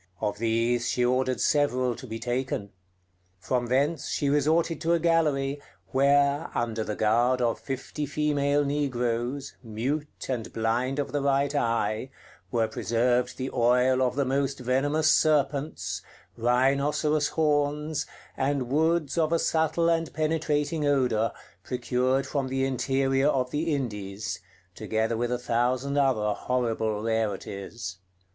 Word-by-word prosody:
Of 105 -1 -2
these 115 +1 +1
she 125 - +1
ordered 130 +1 +1
several 130 -4 +2
to 130 - -9
be 110 0 -5
taken. 120 -3 -3 0.7
From 120 +6 -1
thence 140 +5 0
she 140 - 0
resorted 155 +3 +2
to 165 +1 +2
a 170 - +3
gallery, 150 -4 +1 0.3
where, 140 +2 +3
under 115 -2 -1
the 105 - -4
guard 120 +4 +2
of 120 -2 0
fifty 140 +2 -4
female 145 0 +1
negroes, 130 -1 -1
mute, 130 +7 -4
and 120 -4 -3
blind 120 +4 0
of 145 - -2
the 145 - -1
right 140 +1 +1
eye, 115 -2 0 0.4
were 115 +3 +1
preserved 120 +3 0
the 130 0 -3
oil 125 +2 +3
of 125 -1 +1
the 140 -1 +1
most 135 +1 0
venomous 145 +5 +2
serpents, 145 -1 +1 0.3
rhinoceros 140 +5 +2
horns, 150 0 0 0.3
and 135 -2 -1
woods 160 +1 +1
of 160 -1 +2
a 165 - +4
subtle 160 +1 +1
and 165 -1 +1
penetrating 155 0 0
odor, 125 -6 +2 0.3
procured 125 +2 0
from 140 -1 -2
the 135 0 0
interior 135 +1 +1
of 130 -3 +1
the 160 +2 -1
Indies, 105 -6 -4 0.3
together 110 +1 -1
with 120 +1 -1
a 125 - +1
thousand 125 +3 0
other 125 -7 +2
horrible 110 -4 -1
rarities. 105 -2 -3
130 Hz, 135 wpm, -27 LUFS, 120-145 Hz, 0.7 s, a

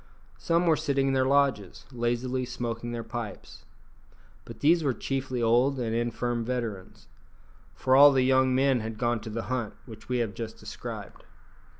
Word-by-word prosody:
Some 170 +1 +1
were 165 -2 +4
sitting 135 -1 0
in - - 0
their 130 -1 +2
lodges, 140 -7 +1
lazily 125 +1 -1
smoking 120 -1 -4
their 120 -1 -4
pipes. 115 -5 -8 0.8
But - - -11
these 165 +3 +4
were 135 -4 0
chiefly 130 -3 -3
old 125 +4 +3
and 115 -2 -2
infirm 120 0 -1
veterans, 115 -6 -5 0.7
for 130 - +2
all 145 +1 +9
the 130 -2 +2
young 130 0 +3
men 135 -1 +3
had 110 0 -5
gone 120 -1 0
to 110 +1 -8
the 115 +1 -4
hunt 120 -4 -3
which 110 -2 -13
we 125 - 0
have 115 -4 -1
just 110 +2 -6
described. - - -8
125 Hz, 170 wpm, -27 LUFS, 115-135 Hz, 0.8 s, all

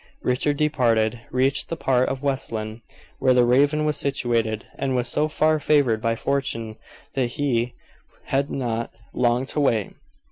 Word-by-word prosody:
Richard 135 +3 +1
departed, 120 -7 +1
reached 135 +2 +1
the 165 - -3
part 130 -4 +2
of 135 +1 -4
West 135 -2 -1
Lynne 110 0 -5 0.4
where 130 -1 +4
the 125 -1 +5
Raven 145 +5 +3
was 150 0 0
situated, 115 -5 -1
and 135 -1 -1
was 125 -1 0
so 150 +4 +1
far 155 0 +2
favored 140 -7 +2
by 115 0 +1
fortune 115 -4 -2 0.4
that 130 -3 +1
he 120 -2 -1 0.5
had 140 +1 0
not 115 -3 -2 0.2
long 125 +1 +1
to 150 - -3
wait. 115 -8 +1
130 Hz, 155 wpm, -23 LUFS, 115-140 Hz, 0.5 s, the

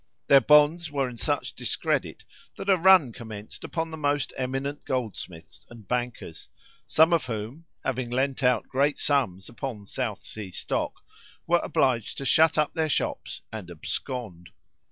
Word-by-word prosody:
Their 140 -1 +7
bonds 150 +4 +5
were 140 -2 0
in 125 -1 -8
such - - -1
discredit, - - -2 0.3
that 195 - 0
a - - +7
run 180 -8 +6
commenced 110 -3 -9
upon 165 -1 -3
the 160 - -6
most 145 -2 0
eminent 135 +3 -3
goldsmiths 100 - -5
and 115 -5 -13
bankers, 120 -8 -4 0.4
some 160 +2 +5
of 165 -6 +2
whom, 115 +8 -5 0.2
having 130 -2 -2
lent 130 +3 0
out 125 -3 +2
great 140 +2 +1
sums 115 -11 0
upon 115 -5 -6
South 110 -1 -4
Sea 105 -3 -7
stock, - - -3 0.4
were 170 0 +3
obliged 125 -5 +1
to 135 - -4
shut 160 +4 +4
up 150 -1 +2
their 160 -1 0
shops - - -2
and 105 -5 -7
abscond. 90 +2 -5
130 Hz, 155 wpm, -26 LUFS, 110-150 Hz, 0.4 s, Their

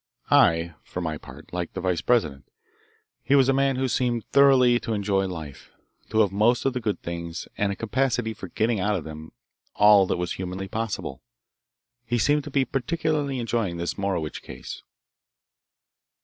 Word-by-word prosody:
I, 85 0 +4
for - - -6
my 80 -4 -3
part, - - -13
liked 90 -2 -4
the - - -2
vice 90 -2 0
president. 75 - +1 0.8
He 140 - +2
was 135 -2 +5
a - - +4
man 135 0 +2
who 130 +1 0
seemed 120 -1 0
thoroughly 130 -3 +5
to 115 -1 -3
enjoy 100 -1 0
life, 80 -6 -8 0.4
to 110 - +3
have 100 -3 +2
most 110 +4 +2
of 135 - +2
the 125 - -2
good 105 -3 -2
things, 85 0 -5
and 100 -1 0
a - - -3
capacity 120 0 0
for 95 - -8
getting 110 +4 0
out 105 +2 +1
of 90 - -3
them 80 0 -9 0.4
all 105 -2 +6
that - - 0
was 90 0 -3
humanly 95 +1 -4
possible. 110 -9 -4 0.8
He 120 0 -1
seemed 145 +6 +2
to - - -6
be 135 -1 +1
particularly 150 0 -1
enjoying 115 -7 -1
this 85 0 -2
Morowitch 95 -6 -2
case. - - -9
105 Hz, 175 wpm, -25 LUFS, 90-125 Hz, 0.8 s, all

